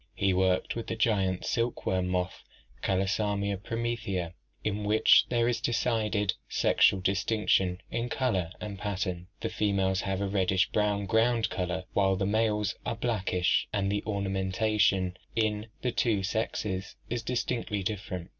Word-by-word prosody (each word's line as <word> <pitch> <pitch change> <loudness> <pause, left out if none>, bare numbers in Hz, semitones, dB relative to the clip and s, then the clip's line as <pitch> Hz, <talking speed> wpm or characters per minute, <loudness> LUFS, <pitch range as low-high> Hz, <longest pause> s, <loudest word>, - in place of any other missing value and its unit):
He 95 -1 +2
worked 95 0 +1
with 115 - -5
the - - -2
giant 100 -5 +1
silk 120 0 -1
worm 90 -1 +1
moth 90 -1 -2 0.4
Callosamia 100 +1 0
promethea, 110 -5 -3 0.3
in 105 0 -1
which 105 +1 +5
there 120 -1 +2
is 120 - 0
decided 110 -4 +1 0.2
sexual 95 - +4
distinction 95 -1 +1
in 120 +1 -2
color 105 -12 0
and 100 -2 -6
pattern. 95 -3 -3
The - - -1
females 95 -2 +1
have 95 -1 -2
a 100 - -1
reddish 95 -1 +1
brown 105 -1 +1
ground 115 +2 +2
color, 90 0 -2
while 95 -1 +3
the 95 +1 -1
males 105 -1 +1
are 115 - -2
blackish, 105 -6 +1
and 100 -2 0
the 105 - -1
ornamentation 100 -1 +1 0.2
in 110 -1 0 0.2
the 125 - +1
two 110 -5 +1
sexes 95 -1 -2 0.2
is 120 -1 -1
distinctly 115 -3 -2
different. 95 -4 -4
100 Hz, 145 wpm, -29 LUFS, 95-110 Hz, 0.4 s, which